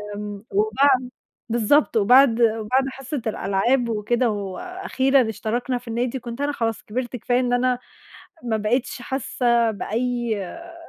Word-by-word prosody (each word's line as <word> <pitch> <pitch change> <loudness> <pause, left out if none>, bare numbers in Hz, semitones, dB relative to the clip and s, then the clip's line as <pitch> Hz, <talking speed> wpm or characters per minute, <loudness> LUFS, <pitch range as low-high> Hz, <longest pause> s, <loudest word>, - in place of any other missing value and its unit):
آمم، 205 -1 -6
وبعد 250 +5 +2 0.4
بالضبط 235 +3 +3
وبعد 245 +3 +6
بعد 230 +4 +2
حصة 270 +1 -5
الألعاب 230 +4 +1
وكده 230 +3 +1
وأخيرًا 260 - 0
اشتركنا 240 +4 -2
في 245 0 -12
النادي، 240 +3 -2
كنت 235 +2 -7
أنا 290 +1 0
خلاص 225 -6 -2
كبرت 245 +3 -4
كفاية 245 +1 0
إن 245 -1 0
أنا 250 0 +1 0.6
ما 230 -2 0
بقيتش 240 +4 -1
حاسة 235 -2 +1
بأي 235 +2 -2
آآ، 335 - -10
240 Hz, 130 wpm, -23 LUFS, 220-260 Hz, 0.6 s, وبعد